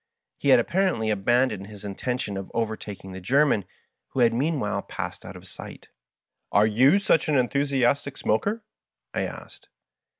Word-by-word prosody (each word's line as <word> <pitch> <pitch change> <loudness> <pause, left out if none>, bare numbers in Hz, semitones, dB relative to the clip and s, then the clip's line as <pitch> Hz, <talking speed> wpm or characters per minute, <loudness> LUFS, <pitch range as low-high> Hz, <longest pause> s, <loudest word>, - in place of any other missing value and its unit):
He 140 - 0
had 130 - +8
apparently 170 - +1
abandoned 105 0 +1
his 105 -1 -11
intention 105 +1 -3
of 95 -1 -6
overtaking 110 -4 -4
the 95 0 -8
German, 130 -1 +2 0.4
who 130 - -2
had 115 -1 +5
mean 145 +5 0
while 105 -3 -1
passed - - -6
out - - -9
of - - -12
sight. - - -11 0.6
"Are 105 +1 +5
yon 130 - +4
such 165 -5 +2
an 150 - +3
enthusiastic 140 +1 +1
smoker?" 205 - 0 0.5
I - - 0
asked. - - -10
120 Hz, 155 wpm, -25 LUFS, 105-140 Hz, 0.6 s, had